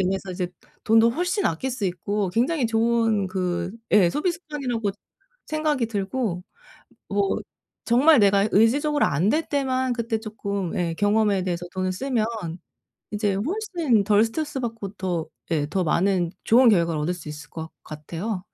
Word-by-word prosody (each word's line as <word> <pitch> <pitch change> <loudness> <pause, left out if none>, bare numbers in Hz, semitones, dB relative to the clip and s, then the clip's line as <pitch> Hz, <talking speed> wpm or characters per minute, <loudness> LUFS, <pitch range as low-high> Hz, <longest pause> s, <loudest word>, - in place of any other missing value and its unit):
인해서 190 +1 -1
이제 180 -1 -3 0.4
돈도 225 +1 +5
훨씬 355 - 0
아낄 210 +12 -2
수 240 -5 -3
있고 195 +3 -2
굉장히 250 - +1
좋은 225 -2 +2
그 180 -2 -2 0.2
예 190 -5 +6
소비 325 - 0
습관이라고 275 - -3 0.6
생각이 305 -6 0
들고 200 -2 -2 0.7
뭐 200 -1 +1 0.5
정말 275 +6 +5
내가 200 0 +4
의지적으로 290 +8 +3
안 160 +8 +1
될 310 +7 +1
때만 260 -3 0
그때 230 -1 -1
쪼끔 200 -4 -4
예 170 -2 -1
경험에 205 0 +2
대해서 175 -1 -3
돈을 185 -1 -1
쓰면 235 +2 -1 0.8
이제 210 -1 0
훨씬 315 - 0
덜 210 +1 +4
스트레스 285 +3 -3
받고 225 -5 -5
더 180 -4 -2 0.2
예 150 -3 +1
더 185 +2 0
많은 175 +1 +1
좋은 245 +2 +6
결과를 170 -5 +2
얻을 175 +4 0
수 165 -4 -10
있을 150 +2 -9
것 160 -1 -6
같아요. 170 +6 -5
210 Hz, 300 characters per minute, -24 LUFS, 185-250 Hz, 0.8 s, 예